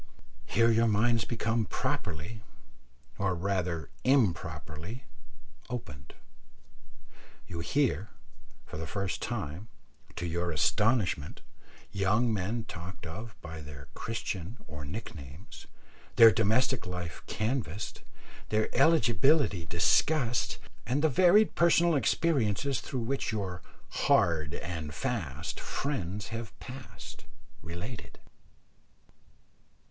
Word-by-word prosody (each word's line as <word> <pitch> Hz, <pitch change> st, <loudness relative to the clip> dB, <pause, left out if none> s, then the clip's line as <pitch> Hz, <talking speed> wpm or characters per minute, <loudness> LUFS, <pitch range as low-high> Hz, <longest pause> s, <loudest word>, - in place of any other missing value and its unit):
Here 115 Hz, 0 st, +4 dB
your 115 Hz, +1 st, +4 dB
minds 115 Hz, +1 st, +3 dB
become 115 Hz, -1 st, 0 dB
properly, 85 Hz, +6 st, -3 dB, 0.8 s
or 95 Hz, -2 st, +1 dB
rather 90 Hz, -2 st, -1 dB
improperly, 110 Hz, -, 0 dB, 0.7 s
opened. 75 Hz, -, -7 dB, 1.3 s
You 85 Hz, -, -6 dB
hear, 110 Hz, -, +1 dB, 0.6 s
for 75 Hz, -, -7 dB
the 80 Hz, -, -4 dB
first 100 Hz, 0 st, -2 dB
time, 85 Hz, +9 st, -4 dB, 0.5 s
to 90 Hz, -, -3 dB
your 85 Hz, +1 st, -1 dB
astonishment, 90 Hz, -, +1 dB, 0.5 s
young 105 Hz, +4 st, +2 dB
men 105 Hz, +4 st, -1 dB
talked 95 Hz, -2 st, -8 dB
of 105 Hz, +7 st, -7 dB
by 80 Hz, -1 st, -7 dB
their 70 Hz, -2 st, -10 dB
Christian 105 Hz, -2 st, -4 dB
or 75 Hz, -1 st, -8 dB
nick 100 Hz, +11 st, -6 dB
names 70 Hz, +6 st, -11 dB, 0.5 s
their 115 Hz, -1 st, +10 dB
domestic 110 Hz, +2 st, +2 dB
life 90 Hz, -2 st, -5 dB
canvassed, 110 Hz, -, -2 dB, 0.5 s
their 110 Hz, 0 st, 0 dB
eligibility 135 Hz, -, +4 dB
discussed, 120 Hz, -, +2 dB, 0.3 s
and 130 Hz, +8 st, 0 dB
the 160 Hz, -, +5 dB
varied 185 Hz, -, +5 dB
personal 170 Hz, 0 st, +5 dB
experiences 135 Hz, -3 st, +2 dB
through 125 Hz, -1 st, -3 dB
which 130 Hz, +1 st, -1 dB
your 95 Hz, -5 st, -3 dB, 0.3 s
"hard 80 Hz, -4 st, +2 dB
and 80 Hz, -4 st, -5 dB
fast" 70 Hz, +3 st, -3 dB
friends 105 Hz, -, -3 dB
have 115 Hz, -1 st, -6 dB
passed, 130 Hz, -1 st, -10 dB, 0.4 s
related. 90 Hz, +8 st, -7 dB
105 Hz, 100 wpm, -30 LUFS, 85-120 Hz, 1.3 s, their